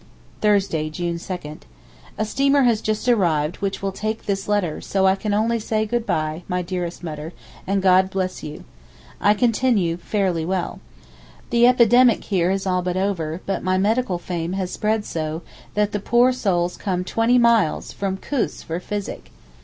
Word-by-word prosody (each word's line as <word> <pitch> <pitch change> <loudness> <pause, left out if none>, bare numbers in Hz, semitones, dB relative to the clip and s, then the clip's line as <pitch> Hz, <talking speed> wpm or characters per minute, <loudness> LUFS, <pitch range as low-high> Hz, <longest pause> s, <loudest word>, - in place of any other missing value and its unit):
Thursday, 195 -7 +2
June 170 +1 -3
2,—A 150 - -8
steamer 275 +5 +2
has 235 -3 +3
just 215 +3 -2
arrived 170 -9 +2
which 195 0 -3
will 195 - 0
take 215 +3 -4
this 195 -1 -2
letter, 205 -7 0
so 190 -1 0
I 190 - +5
can 205 +2 -3
only 225 +3 +1
say 215 0 -1
good 235 +1 -2
bye, 155 +1 -1
my 180 -1 -1
dearest 175 -1 -4
Mutter, 155 0 -6 0.3
and 195 0 0
God 185 0 +5
bless 190 -1 -3
you. 150 0 -8 0.6
I 205 +1 +4
continue 225 -7 +2
very 175 - -22
fairly 190 -6 +1
well. 180 +1 -2 0.7
The 240 0 +5
epidemic 245 -1 +5
here 180 -3 +1
is 195 0 -1
all 180 -1 +1
but 180 0 -2
over; 180 -4 -2
but 195 - -2
my 185 0 +1
medical 210 0 +1
fame 175 0 -4
has 190 -1 -2
spread 215 0 0
so, 160 0 -4 0.3
that 210 0 +1
the 205 - -2
poor 240 +5 +3
souls 180 -7 0
come 180 -2 -2
twenty 230 +6 +2
miles 235 -8 +3
(from 195 -1 -2
Koos) 270 +5 -2
for 165 +2 -4
physic. 190 - -5
195 Hz, 170 wpm, -22 LUFS, 175-215 Hz, 0.7 s, I